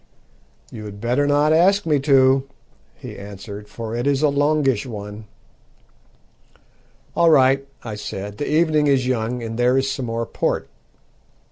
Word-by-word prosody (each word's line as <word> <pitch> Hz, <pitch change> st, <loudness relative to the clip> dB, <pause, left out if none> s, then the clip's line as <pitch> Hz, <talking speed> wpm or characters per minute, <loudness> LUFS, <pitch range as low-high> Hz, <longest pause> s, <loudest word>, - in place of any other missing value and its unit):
"You 110 Hz, -, -8 dB
had 100 Hz, -1 st, -9 dB
better 125 Hz, +6 st, 0 dB
not 145 Hz, +2 st, +3 dB
ask 195 Hz, +5 st, +3 dB
me 150 Hz, -3 st, +2 dB
to," 135 Hz, -1 st, +3 dB, 0.5 s
he -, -, -10 dB
answered, 100 Hz, +1 st, -9 dB
"for 110 Hz, +2 st, -6 dB
it 120 Hz, +3 st, -2 dB
is 140 Hz, +1 st, +1 dB
a 150 Hz, -, +4 dB
longish 145 Hz, -5 st, +1 dB
one." 105 Hz, -1 st, -8 dB, 1.9 s
"All 170 Hz, -1 st, +4 dB
right," 135 Hz, -2 st, +4 dB, 0.2 s
I 115 Hz, -, -6 dB
said, 105 Hz, -1 st, -7 dB
"the 145 Hz, -, -2 dB
evening 155 Hz, -1 st, +2 dB
is 135 Hz, -3 st, +2 dB
young, 120 Hz, -1 st, -2 dB
and 115 Hz, +1 st, -5 dB
there 125 Hz, +2 st, +3 dB
is 135 Hz, 0 st, 0 dB
some 135 Hz, -2 st, -4 dB
more 115 Hz, 0 st, -2 dB
port." -, -, -2 dB
130 Hz, 150 wpm, -21 LUFS, 110-145 Hz, 1.9 s, a